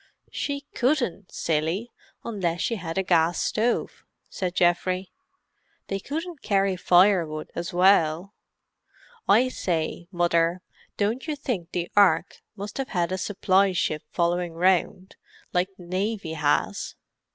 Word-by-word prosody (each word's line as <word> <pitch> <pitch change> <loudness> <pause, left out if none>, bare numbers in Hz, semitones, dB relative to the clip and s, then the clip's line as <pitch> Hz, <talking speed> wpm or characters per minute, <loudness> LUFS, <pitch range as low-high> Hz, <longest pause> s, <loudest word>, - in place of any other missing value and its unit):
"She 280 -1 -3
couldn't, 245 - 0
silly, 165 +9 -1 0.3
unless 180 -7 -2
she 230 - 0
had 165 -3 -5
a 190 - +2
gas 170 -1 +2
stove," 230 +3 -1 0.3
said 180 -2 -3
Geoffrey. 180 +1 +1 0.8
"They 195 - -1
couldn't 320 - -5
carry 195 -2 +1
firewood 175 -4 +3
as 170 0 -4
well. 180 0 +3 0.9
I 240 +5 +5
say, 170 -7 -2
Mother, 175 0 +1 0.3
don't 220 +8 -1
you 305 - -1
think 240 - -3
the 175 -1 -2
Ark 200 -1 +3
must 205 +5 -7
have 270 0 -2
had 175 -2 0
a 185 - -1
supply 195 0 +2
ship 155 -3 0
following 175 0 0
round, 185 +2 +1 0.4
like 180 +1 +1
the 180 - -12
Navy 190 -1 -2
has?" 150 -2 0
185 Hz, 130 wpm, -25 LUFS, 170-205 Hz, 0.9 s, I